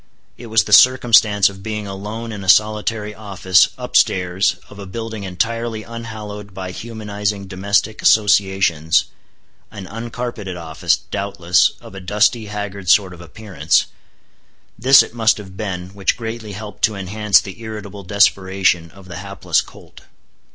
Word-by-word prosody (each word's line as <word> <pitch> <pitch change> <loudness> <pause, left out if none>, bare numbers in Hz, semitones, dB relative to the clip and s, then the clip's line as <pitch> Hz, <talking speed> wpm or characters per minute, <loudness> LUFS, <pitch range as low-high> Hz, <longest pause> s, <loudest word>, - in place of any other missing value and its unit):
It 120 - -11
was 110 0 +3
the 105 - -2
circumstance 115 -5 +6
of 95 -1 -7
being 105 0 -5
alone 105 +4 -6
in 105 -3 -7
a 95 - -3
solitary 105 +1 +2
office, 95 -3 +2
up - - -7
stairs, 90 +1 +2
of 105 - -14
a 100 - -8
building 110 +1 -6
entirely 115 +4 -2
unhallowed 105 -4 -8
by 95 -1 -6
humanizing 105 -2 -4
domestic 100 +3 -1
associations—an 95 -1 0
uncarpeted 115 -3 -6
office, 80 -2 0
doubtless, 95 -4 +1
of - - -14
a 95 - -8
dusty, 105 +4 +1
haggard 100 -3 -5
sort 95 -1 +4
of 85 - -12
appearance;—this 110 +6 0
it - - -11
must 115 -2 +2
have 95 -3 -11
been, 95 -3 -5
which 95 -1 -1
greatly 115 -2 -6
helped 105 0 -9
to 110 - -3
enhance 100 +1 +2
the 95 +4 -9
irritable 105 -3 -8
desperation 95 -3 +1
of 95 +1 -16
the 90 -1 -8
hapless 100 +1 -1
Colt. - - -15
100 Hz, 140 wpm, -19 LUFS, 95-110 Hz, -, circumstance